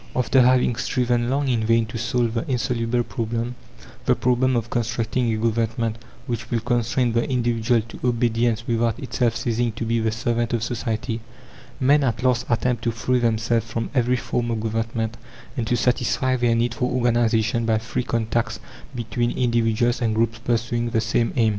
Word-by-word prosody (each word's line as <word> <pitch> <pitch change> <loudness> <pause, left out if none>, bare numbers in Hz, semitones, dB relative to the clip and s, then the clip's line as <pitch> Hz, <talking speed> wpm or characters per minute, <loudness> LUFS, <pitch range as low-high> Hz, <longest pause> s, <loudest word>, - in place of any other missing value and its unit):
After 130 +1 +3
having 125 -1 +3
striven 120 -1 0
long 140 +2 0
in 120 -4 +1
vain 115 +1 +3
to 115 +1 -7
solve 120 0 0
the 115 - -1
insoluble 120 -1 0
problem 115 0 -3 0.5
the - - +4
problem 125 +1 +2
of 115 0 -2
constructing 115 0 0
a 110 - 0
government 115 0 -1 0.3
"which 115 -3 -4
will 120 - +1
constrain 120 +1 +1
the 115 +4 0
individual 120 -2 +1
to 115 +1 -11
obedience 115 -1 +1
without 115 -1 0
itself 120 -2 -1
ceasing 115 +1 0
to 115 +1 -4
be 115 +1 +1
the 110 0 0
servant 120 0 -1
of 115 -2 0
society," 115 -1 -2 0.6
men 140 +3 +4
at 120 -2 -1
last 125 -1 +2
attempt 120 0 0
to 115 - +2
free 125 +2 0
themselves 115 -1 +1
from 115 0 -3
every 125 -2 +2
form 120 -1 -2
of 115 -2 -1
government 115 0 -2 0.4
and 120 -5 -2
to 120 - +1
satisfy 130 +1 +1
their 120 -2 +2
need 115 0 +1
for 125 +1 -1
organization 115 -2 +1
by 110 -1 +3
free 115 +3 -3
contacts 115 -1 -1 0.4
between 120 0 -1
individuals 120 -1 +1
and 110 -2 +1
groups 115 +1 0
pursuing 120 0 -1
the 115 -1 +1
same 115 +1 +1
aim. 115 -4 +3
115 Hz, 175 wpm, -23 LUFS, 115-120 Hz, 0.6 s, the